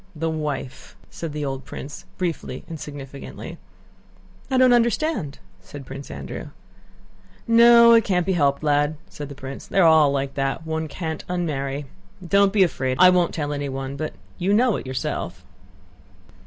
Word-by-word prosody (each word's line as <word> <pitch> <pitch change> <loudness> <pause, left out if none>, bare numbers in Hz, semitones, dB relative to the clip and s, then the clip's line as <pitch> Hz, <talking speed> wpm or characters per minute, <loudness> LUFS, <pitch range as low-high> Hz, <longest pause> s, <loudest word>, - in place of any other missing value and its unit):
"The 160 +1 -1
wife!" 150 -4 -5 0.2
said 165 -2 -6
the 150 0 -3
old 135 -1 -4
prince, 145 - -8
briefly 165 -7 -3
and 160 -2 -7
significantly. 140 -2 -8 0.9
"I 260 - +1
don't 255 -1 +6
understand!" 235 - +1 0.2
said 135 +9 -10
Prince 135 +2 -8
Andrew. - - -7 1.0
"No, 235 0 +8
it 230 -1 +6
can't 180 -4 +1
be 190 - +1
helped, 140 -4 +1
lad," 145 +1 +2
said 145 -6 -8
the 140 - -8
prince. 135 0 -8
"They're 190 -3 +3
all 160 -3 +6
like 140 -1 -2
that; 135 +3 -2
one 160 0 -2
can't 160 0 -5
unmarry. 145 -5 -2 0.4
Don't 200 +2 +4
be 200 -1 +5
afraid; 130 -7 -1
I 185 0 +8
won't 180 -1 +2
tell 145 -2 -2
anyone, 135 -1 -4
but 155 +2 -4 0.3
you 195 +3 +2
know 240 -1 +3
it - - -6
yourself." 130 0 -4
155 Hz, 155 wpm, -23 LUFS, 140-185 Hz, 1.0 s, No